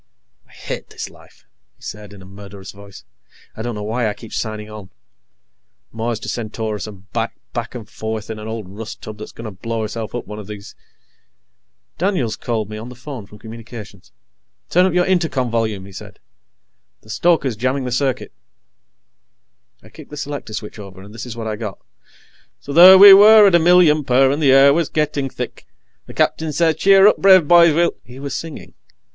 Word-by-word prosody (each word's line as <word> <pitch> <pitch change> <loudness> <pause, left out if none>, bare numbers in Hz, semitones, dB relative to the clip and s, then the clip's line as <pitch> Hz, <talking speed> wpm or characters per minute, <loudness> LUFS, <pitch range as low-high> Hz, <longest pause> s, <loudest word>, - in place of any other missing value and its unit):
I - - -25
hate - - -8
this - - -8
life," - - -21 0.3
he - - -24
said 105 -1 -9
in 100 -2 -13
a - - -14
murderous 100 0 -12
voice. 100 -1 -14 0.5
"I - - -7
don't 120 0 -4
know 105 - -6
why 110 +2 -1
I 105 - -5
keep 110 +1 -13
signing 110 -1 -4
on. 105 -3 -11 1.0
Mars 115 0 -3
to - - -8
Centaurus 110 -2 -4
and 95 -2 -14
back, 115 0 -3 0.2
back 120 +1 -5
and 115 -4 -8
forth, 110 0 -6
in 110 - -7
an 105 - -8
old 110 -3 -6
rust 110 +3 -10
tub 105 -1 -9
that's 105 - -9
going 115 - -11
to 110 - -6
blow 115 +3 -5
herself 110 +1 -6
up 120 - -5
one 105 0 -8
of 105 - -10
these 105 -1 -10 0.6
" - - -53
Daniels 170 - -1
called 110 -4 -3
me 105 0 -8
on 115 +3 -9
the 125 - -11
phone 125 -4 -9
from 105 - -15
Communications. 110 - -12 0.6
"Turn 180 +2 +4
up 185 - -2
your 180 0 +2
Intercom 160 -10 -1
volume," 110 -4 -2
he 100 - -13
said. 95 - -11 0.8
"The 110 - -12
stoker's 135 0 +1
jamming 130 +4 -2
the 125 - -4
circuit." 130 0 -2 1.5
I - - -16
kicked - - -14
the 150 - -10
selector 145 -6 -6
switch 110 0 -7
over, 95 -2 -11
and 100 +2 -14
this 115 +2 -8
is 120 -1 -8
what 115 - -5
I 110 -1 -3
got: 105 -4 -6
"_ - - -45 0.8
so 140 - -8
there 180 +4 +9
we 200 +1 +11
were 210 +2 +8
at 195 - +4
a 170 - +6
million 165 -3 +4
per, 135 0 +3
and 145 +3 -2
the 140 -3 +4
air 135 +1 +6
was 165 0 0
gettin' 150 -3 -2
thick. - - -8 0.4
The - - -11
Skipper 160 -1 0
says 160 +1 +1
'Cheer 195 +2 +5
up, 210 - +5
brave 190 -5 +5
boys, 170 -2 +6
we'll 170 +1 +2
'_" - - -29
He 125 +1 -14
was 140 0 -6
singing. 165 -2 -8
115 Hz, 205 wpm, -19 LUFS, 105-150 Hz, 1.5 s, we